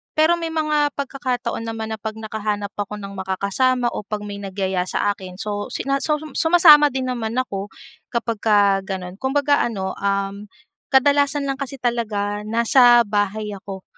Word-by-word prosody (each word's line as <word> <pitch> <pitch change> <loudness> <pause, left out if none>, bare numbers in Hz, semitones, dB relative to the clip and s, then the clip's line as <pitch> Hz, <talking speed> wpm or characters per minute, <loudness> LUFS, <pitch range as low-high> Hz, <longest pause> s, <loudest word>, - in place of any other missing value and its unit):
pero 325 +2 +3
may 330 - -3
mga 305 -2 0
pagkakataon 260 -4 -3
naman 225 -1 -4
na 220 - -4
'pag 215 +1 -5
nakahanap 210 -2 -3
ako 205 0 -3
ng 200 -1 -8
makakasama, 200 +6 0
o 210 - -6
'pag 210 -1 -4
may 205 -1 -6
nagyaya 190 -2 -2
sa 205 - 0
akin, 185 -2 -8
so, 205 +1 -4
sina 275 0 -2
suhum 300 +1 -2
sumasama 320 -2 +7
din 265 -2 -3
naman 230 -2 -3
ako 205 -6 -2 0.4
kapagka 210 -4 +2
gano'n. 185 0 -6
Kumbaga 285 +2 +2
ano, 190 -5 -3
um, 200 +1 -2 0.4
kadalasan 285 +1 +3
lang 275 -1 -3
kasi 275 -1 -5
talaga 210 -4 -2
nasa 240 +1 +5
bahay 210 0 -1
ako, 195 -1 -8
220 Hz, 155 wpm, -21 LUFS, 200-270 Hz, 0.4 s, sumasama